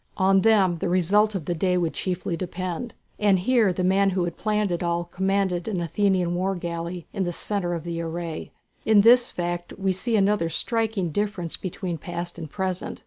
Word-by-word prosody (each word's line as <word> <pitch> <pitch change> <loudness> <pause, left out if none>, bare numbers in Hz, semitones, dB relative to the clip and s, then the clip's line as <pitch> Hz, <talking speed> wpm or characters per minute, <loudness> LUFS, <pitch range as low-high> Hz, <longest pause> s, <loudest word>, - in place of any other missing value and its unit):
On 195 0 +4
them 195 -5 +4
the 175 - -1
result 200 +4 +3
of 175 -6 -3
the 175 - -1
day 180 +2 +1
would 170 -2 0
chiefly 180 -2 -2
depend, 185 +5 -4 0.2
and 205 -2 +4
here 220 +1 +3
the 180 +1 -2
man 195 +2 +3
who 185 -1 0
had 175 -1 -3
planned 210 -2 0
it 175 - -1
all, 170 0 0
commanded 190 0 -1
an 200 -5 -1
Athenian 180 0 +1
war 190 +2 0
galley 170 0 -5
in 195 - -1
the 175 - -1
centre 175 -1 -2
of 165 - -5
the 170 -1 -4
array. 165 -1 -5 0.3
In 215 -2 +5
this 240 +3 +6
fact 175 0 -4
we 195 -1 0
see 225 +5 0
another 200 -4 +2
striking 220 -3 -1
difference 200 -2 -2
between 180 -2 -5
past 175 +1 -6
and 160 -2 -7
present. 185 +1 -3
185 Hz, 195 wpm, -25 LUFS, 175-200 Hz, 0.3 s, this